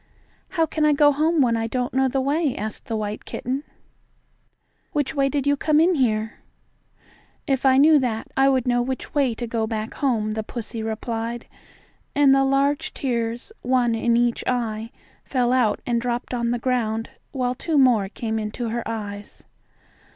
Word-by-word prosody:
"How 325 - +4
can 315 0 -2
I 300 0 +5
go 290 0 +5
home 310 +2 +2
when 235 -2 +2
I 225 0 -1
don't 245 +1 -2
know 265 0 +3
the 270 +1 0
way?" 285 0 0
asked 215 0 -5
the 230 -4 -3
white 210 0 -4
kitten. 265 +4 -4 1.3
"Which 290 -3 0
way 275 -2 +2
did 280 0 -1
you 285 0 +3
come 305 +1 +2
in 345 +3 +4
here?" 220 -6 0 1.1
"If 270 -1 +1
I 260 0 +5
knew 300 +2 +6
that, 230 -4 -2
I 270 0 +4
would 260 -3 +1
know 245 0 +2
which 260 +1 -4
way 270 -5 +2
to 240 - -4
go 225 -1 -1
back 220 0 -4
home," 225 -6 0
the 220 0 -2
pussy 225 +1 -6
replied, 225 +1 -4 0.7
and 280 -1 +5
the 270 0 +4
large 275 +1 +1
tears, 235 - -2
one 245 -2 +2
in 230 +1 +2
each 240 0 +1
eye, 225 -3 -1 0.3
fell 250 -2 +1
out 235 -5 +2
and 235 -1 0
dropped 245 +1 -3
on 235 -1 0
the 240 - 0
ground, 230 -3 -1 0.2
while 250 -2 -1
two 310 +4 -1
more 240 -8 +4
came 220 +1 -3
into 220 +2 -4
her 235 +1 -2
eyes. 205 -2 -6
245 Hz, 180 wpm, -23 LUFS, 225-275 Hz, 1.3 s, knew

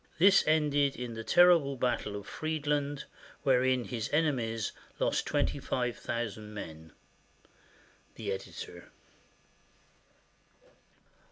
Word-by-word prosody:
This 195 +4 +6
ended 145 -3 +3
in 120 -1 -5
the 115 0 -6
terrible 170 -3 +5
battle 120 -5 -1
of 100 0 -6
Friedland, 145 -2 -2 0.4
wherein 130 -2 +3
his 115 -2 -4
enemies 120 -8 0 0.3
lost - - 0
twenty - - 0
five 125 -2 -1
thousand 110 -2 -4
men. 80 -5 -8 1.2
The 105 -3 -4
Editor. 95 0 -7
125 Hz, 95 wpm, -31 LUFS, 110-145 Hz, 1.2 s, This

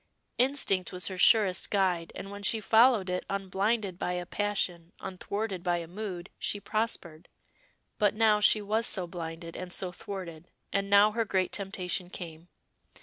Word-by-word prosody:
Instinct 250 -8 +2
was 180 -1 -1
her 190 - -6
surest 200 -3 +5
guide, 185 -4 +1
and 195 - -7
when 205 0 -8
she 220 +3 +2
followed 225 -1 +4
it 180 0 -2
unblinded 195 0 -1
by 180 - -1
a 180 0 -3
passion, 180 -3 -2
unthwarted 195 +1 -4
by 175 -1 +1
a 170 - -5
mood, 185 -1 -6
she 205 - -1
prospered. 200 -7 -3 0.7
But 205 -1 +3
now 215 -1 +4
she 210 0 +4
was 220 +3 0
so 185 -3 0
blinded 165 -1 -7
and 185 -1 -6
so 185 0 -2
thwarted, 180 -3 -8 0.2
and 200 0 0
now 200 +1 +6
her 230 +1 0
great 190 -3 0
temptation 185 -2 -2
came. 165 -2 -9
190 Hz, 160 wpm, -29 LUFS, 180-210 Hz, 0.7 s, now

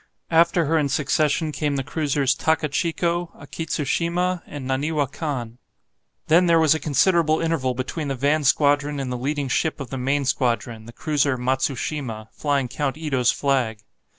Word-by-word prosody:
After 170 +1 +4
her 160 +2 +2
in 145 -2 0
succession 150 +2 +1
came 150 -1 -1
the 135 - -1
cruisers 145 -2 0
"Takachico," 165 +2 -1
"Akitsushima," 170 +4 -1
and 145 -3 -7
"Naniwa 145 +3 0
Kan." 125 -8 -4 0.7
Then 175 +3 +4
there 165 -1 +5
was 160 -2 +5
a 160 - -2
considerable 155 +2 +2
interval 155 -6 0
between 135 +4 -4
the 135 - -2
van 145 +4 +1
squadron 145 +1 +2
and 130 -2 -3
the - - -2
leading 140 +3 -2
ship 155 +5 0
of 135 -4 -7
the 135 - -3
main 135 +2 0
squadron, 115 -4 -1
the - - -9
cruiser 140 0 0
"Matsushima," 130 -2 -2
flying 140 -3 -1
Count 140 +2 -2
Ito's 135 -6 +1
flag. 125 -6 -1
145 Hz, 155 wpm, -23 LUFS, 130-160 Hz, 0.7 s, there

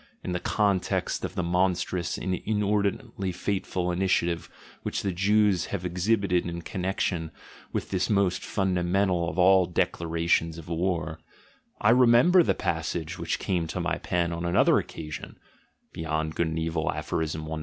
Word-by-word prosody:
In - - -3
the 90 - -1
context 100 -2 0
of - - -4
the 90 - -1
monstrous 90 0 0
and 95 - -2
inordinately 100 -1 -1
fateful 90 -1 -2
initiative 85 -2 0 0.3
which - - -3
the 100 - 0
Jews 100 0 +2
have 90 -3 -4
exhibited 90 +1 +1
in 85 0 -5
connection 90 -3 -2 0.4
with - - -3
this 95 -1 0
most 100 -3 +1
funda 95 -3 0
mental 90 -1 +1
of - - -7
all 95 0 +5
declarations 85 -1 0
of 85 0 -10
war, 85 -2 -1 0.6
I 105 - +4
remember 125 +9 +6
the - - +2
passage 80 +1 -2
which 85 0 -1
came 90 -4 -1
to - - -4
my - - -1
pen 85 -1 -1
on 85 0 -4
another 85 0 +4
occasion 75 -2 -7 0.6
(Beyond 80 -1 -2
Good 85 - 0
and 80 0 -3
Evil, 80 0 -1
Aph. - - -6
90 Hz, 150 wpm, -27 LUFS, 85-95 Hz, 0.6 s, remember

